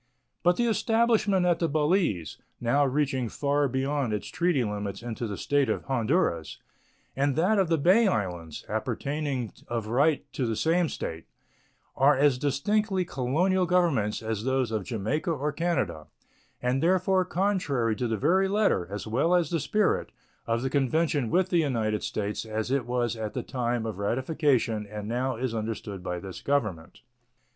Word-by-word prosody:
But 175 Hz, +1 st, +4 dB
the 240 Hz, -, +2 dB
establishment 225 Hz, -3 st, +2 dB
at 175 Hz, -1 st, +2 dB
the 165 Hz, -, +1 dB
Balize, 150 Hz, -, +1 dB, 0.2 s
now 120 Hz, +5 st, +2 dB
reaching 135 Hz, -3 st, 0 dB
far 145 Hz, +2 st, +1 dB
beyond 135 Hz, -1 st, -1 dB
its 105 Hz, -, -3 dB
treaty 175 Hz, -7 st, +1 dB
limits 105 Hz, 0 st, -4 dB
into 120 Hz, 0 st, -4 dB
the 100 Hz, -2 st, -5 dB
State 145 Hz, -2 st, +1 dB
of -, -, -1 dB
Honduras, 125 Hz, -, 0 dB, 0.6 s
and 140 Hz, 0 st, +1 dB
that 190 Hz, +7 st, +3 dB
of 190 Hz, -, +3 dB
the 165 Hz, 0 st, +2 dB
Bay 190 Hz, +9 st, +4 dB
Islands, 90 Hz, -, -3 dB
appertaining 125 Hz, +3 st, -2 dB
of 115 Hz, -2 st, -3 dB
right 140 Hz, +7 st, +2 dB
to 130 Hz, -, -1 dB
the 115 Hz, -, -1 dB
same 165 Hz, +5 st, +2 dB
State, 80 Hz, 0 st, -5 dB, 0.7 s
are 140 Hz, +1 st, +4 dB
as 140 Hz, -2 st, +3 dB
distinctly 190 Hz, -, 0 dB
colonial 175 Hz, +8 st, +1 dB
governments 160 Hz, -, +1 dB
as 110 Hz, -1 st, -3 dB
those 130 Hz, -2 st, 0 dB
of 110 Hz, -4 st, -2 dB
Jamaica 125 Hz, -, -2 dB
or 150 Hz, -1 st, -1 dB
Canada, 125 Hz, -, -2 dB, 0.6 s
and 125 Hz, +2 st, +1 dB
therefore 185 Hz, +2 st, +3 dB
contrary 180 Hz, -, 0 dB
to 125 Hz, -, -1 dB
the 110 Hz, -1 st, -1 dB
very 190 Hz, -, +3 dB
letter, 200 Hz, -, +1 dB
as 105 Hz, +1 st, -5 dB
well 140 Hz, +11 st, +2 dB
as 175 Hz, 0 st, +1 dB
the 165 Hz, -, +1 dB
spirit, 210 Hz, +6 st, 0 dB, 0.4 s
of 115 Hz, +1 st, 0 dB
the 135 Hz, -, 0 dB
convention 140 Hz, -1 st, +1 dB
with 185 Hz, +5 st, +2 dB
the 175 Hz, -, +3 dB
United 115 Hz, -8 st, 0 dB
States 105 Hz, 0 st, -3 dB
as 110 Hz, +2 st, -3 dB
it 135 Hz, -4 st, 0 dB
was 120 Hz, -1 st, 0 dB
at 110 Hz, -2 st, -5 dB
the -, -, -2 dB
time 120 Hz, -3 st, -2 dB
of 110 Hz, -3 st, -5 dB
ratification 125 Hz, -2 st, 0 dB
and 105 Hz, 0 st, -6 dB
now 125 Hz, +3 st, -1 dB
is 125 Hz, 0 st, -2 dB
understood 110 Hz, -3 st, -4 dB
by 90 Hz, 0 st, -3 dB
this 95 Hz, +1 st, -8 dB
Government. 105 Hz, -13 st, -2 dB
135 Hz, 165 wpm, -27 LUFS, 110-170 Hz, 0.7 s, But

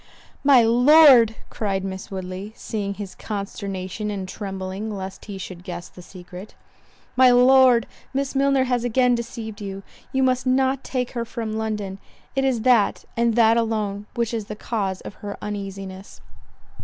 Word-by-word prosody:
"My 275 Hz, -4 st, +6 dB
Lord," 245 Hz, -1 st, +7 dB, 0.2 s
(cried 195 Hz, -3 st, -2 dB
Miss 190 Hz, +1 st, -6 dB
Woodley, 190 Hz, +1 st, -6 dB
seeing 200 Hz, -2 st, -4 dB
his 200 Hz, -2 st, -7 dB
consternation 200 Hz, -1 st, -5 dB
and 195 Hz, -2 st, -4 dB
trembling 195 Hz, +2 st, -5 dB
lest 190 Hz, 0 st, -7 dB
he 200 Hz, -2 st, -7 dB
should 180 Hz, -2 st, -8 dB
guess 175 Hz, -1 st, -7 dB
the 180 Hz, -, -13 dB
secret,) 180 Hz, +2 st, -11 dB, 0.6 s
"My 255 Hz, 0 st, +7 dB
Lord, 250 Hz, -1 st, +6 dB, 0.3 s
Miss 275 Hz, 0 st, -2 dB
Milner 275 Hz, -1 st, +3 dB
has 245 Hz, -2 st, 0 dB
again 245 Hz, +1 st, +3 dB
deceived 230 Hz, -3 st, -5 dB
you—you 195 Hz, +6 st, -5 dB
must 255 Hz, 0 st, +1 dB
not 265 Hz, +1 st, +2 dB
take 250 Hz, -2 st, -2 dB
her 235 Hz, -2 st, -3 dB
from 225 Hz, -1 st, -5 dB
London—it 215 Hz, +4 st, -4 dB
is 260 Hz, -4 st, +1 dB
that, 240 Hz, -4 st, +3 dB
and 235 Hz, -1 st, +2 dB
that 230 Hz, -1 st, +5 dB
alone, 210 Hz, -3 st, -1 dB
which 235 Hz, -1 st, -1 dB
is 220 Hz, -3 st, -2 dB
the 210 Hz, -, -7 dB
cause 200 Hz, -4 st, -3 dB
of -, -, -8 dB
her 205 Hz, -1 st, -6 dB
uneasiness." 195 Hz, -2 st, -7 dB
220 Hz, 150 wpm, -23 LUFS, 195-245 Hz, 0.6 s, Lord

